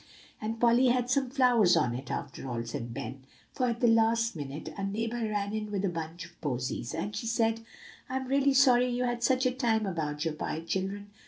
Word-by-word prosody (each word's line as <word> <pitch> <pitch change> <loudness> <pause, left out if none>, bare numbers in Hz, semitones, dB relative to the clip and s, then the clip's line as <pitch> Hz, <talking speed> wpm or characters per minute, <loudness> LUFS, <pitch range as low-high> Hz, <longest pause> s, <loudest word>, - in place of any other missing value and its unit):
"And 225 +1 -3
Polly 240 +2 +5
had 245 0 +2
some 270 -1 +2
flowers 245 -9 +4
on 125 -7 +2
it, 130 +3 -6
after 135 - -5
all," 115 -1 -2
said 115 0 -5
Ben; 130 +1 -6 0.3
"for, 255 - 0
at 235 +1 -2
the 240 - +5
last 230 0 +3
minute, 150 +1 -6
a 200 - -5
neighbor 225 +4 -2
ran 205 -1 -2
in 215 -1 -3
with 200 -1 -1
a - - +1
bunch 165 0 -5
of 170 0 -18
posies; 130 -2 -3
and 205 +6 -3
she 220 +2 -3
said: 225 0 +1 0.5
'I'm 260 0 -2
real 275 +1 +3
sorry 250 -2 +5
you 245 +1 -1
had 240 -1 -1
such 260 +1 +2
a 255 - +3
time 230 -4 +1
about 155 -4 -2
your 160 - 0
pie, 155 +1 -4
children. 195 +4 -3
215 Hz, 215 wpm, -29 LUFS, 160-240 Hz, 0.5 s, Polly